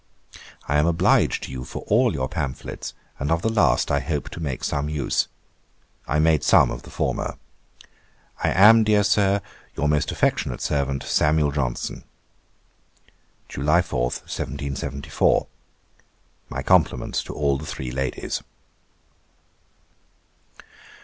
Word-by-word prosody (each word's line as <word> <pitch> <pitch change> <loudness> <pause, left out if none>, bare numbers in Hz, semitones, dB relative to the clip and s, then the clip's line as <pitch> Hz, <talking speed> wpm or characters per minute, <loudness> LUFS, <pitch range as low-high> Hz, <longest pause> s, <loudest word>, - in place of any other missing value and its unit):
'I 75 - +2
am 75 +2 +3
obliged 85 -1 +2
to - - -6
you 65 -1 -5
for - - -7
all 120 +3 +3
your 65 -6 -2
pamphlets, 65 -2 -5 0.2
and 70 +3 -1
of 80 0 +1
the 115 - +1
last 75 - +3
I - - +2
hope 75 -4 -3
to - - -8
make 70 -6 -4
some 70 +1 -1
use. 75 -2 0 0.8
I 75 - 0
made 80 -1 +3
some - - +5
of - - -5
the - - -13
former. - - -2 1.1
'I - - +3
am, 110 +4 +7
dear 105 -1 +3
Sir, 100 -1 +2 0.3
'Your 75 - 0
most 75 0 +1
affectionate 65 - 0
servant, 70 -2 -1
'SAM. 75 +1 +2
JOHNSON.' 65 -4 -3 1.4
'July 75 +6 +2
4, 70 -8 -3
1774.' 70 +2 -2 1.0
'My 70 +2 -4
compliments 80 -8 +2
to - - -8
all 70 -2 +1
the 75 - -8
three 65 -2 -5
ladies.' 65 0 -3
75 Hz, 130 wpm, -23 LUFS, 70-85 Hz, 1.4 s, am